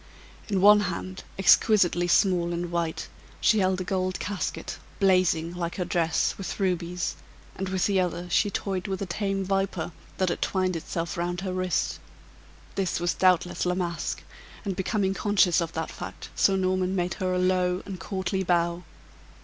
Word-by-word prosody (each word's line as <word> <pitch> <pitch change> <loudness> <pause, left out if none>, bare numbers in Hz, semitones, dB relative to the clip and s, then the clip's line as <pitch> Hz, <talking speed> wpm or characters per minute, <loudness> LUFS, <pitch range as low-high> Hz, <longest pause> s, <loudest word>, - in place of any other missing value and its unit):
In 195 -3 +1
one 210 +1 +8
hand, 185 -1 -4
exquisitely 190 -3 +4
small 175 -2 +3
and 175 0 -3
white, 170 -2 -2 0.3
she 220 - +4
held 185 -1 +1
a - - -1
gold 185 0 -1
casket, 205 -1 -4 0.2
blazing 180 -4 +3
(like 175 -1 -3
her 180 - -2
dress) 165 -2 +1
with 195 - -5
rubies, 180 -2 -1 0.4
and 190 0 -3
with 185 -1 +1
the 195 -2 +2
other 175 -1 -1
she 205 +4 +2
toyed 195 -2 -3
with 195 0 -2
a - - -2
tame 195 0 -2
viper, 195 -3 -1 0.3
that 185 -1 +1
had - - -3
twined 185 -2 0
itself 165 +1 -4
round 175 +1 -2
her 190 -1 -3
wrist. 185 -1 -1 0.7
This 190 -4 -1
was 175 0 +1
doubtless 180 -1 +2
La 180 0 +1
Masque, 175 -2 -3 0.4
and 195 -2 -2
becoming 195 0 0
conscious 195 -4 +3
of 165 0 -3
that 160 0 -3
fact - - -8
Sir 195 - +4
Norman 185 0 0
made 175 -1 0
her 185 0 +1
a - - +1
low 180 0 +1
and 195 -2 -6
courtly 190 0 -2
bow. 175 -1 +1
185 Hz, 170 wpm, -27 LUFS, 175-190 Hz, 0.7 s, one